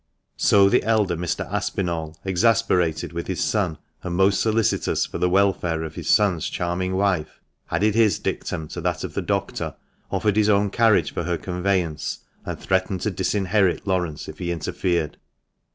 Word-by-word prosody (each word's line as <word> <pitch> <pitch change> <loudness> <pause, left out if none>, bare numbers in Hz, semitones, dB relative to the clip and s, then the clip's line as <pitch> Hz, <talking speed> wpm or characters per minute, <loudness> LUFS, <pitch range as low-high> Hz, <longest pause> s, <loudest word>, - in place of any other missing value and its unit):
So 100 -1 +5
the - - +4
elder 105 -5 +1
Mr. 85 0 -2
Aspinall, 80 -3 -2
exasperated 95 -5 +2
with 85 0 -4
his 95 - -1
son, 95 -8 0 0.2
and 90 -1 -4
most 95 +1 +3
solicitous 110 0 +1
for - - -6
the 90 +1 +2
welfare 90 -4 +1
of 80 - -6
his - - -5
son's 95 -6 +3
charming 90 +2 -2
wife, 95 -5 0 0.3
added 105 0 +2
his 110 -2 +3
dictum 80 - -3
to - - -6
that - - -1
of - - -5
the - - -1
doctor, - - -2 0.3
offered 105 -1 0
his 105 -1 +4
own 100 -1 +3
carriage 115 -2 +3
for 85 - -3
her 85 0 0
conveyance, 90 -2 -2 0.3
and - - -4
threatened 95 -1 0
to 105 - 0
disinherit 95 0 +1
Laurence 90 -6 -1
if - - -9
he 85 -1 -2
interfered. 85 -1 -1
95 Hz, 165 wpm, -23 LUFS, 85-100 Hz, 0.3 s, So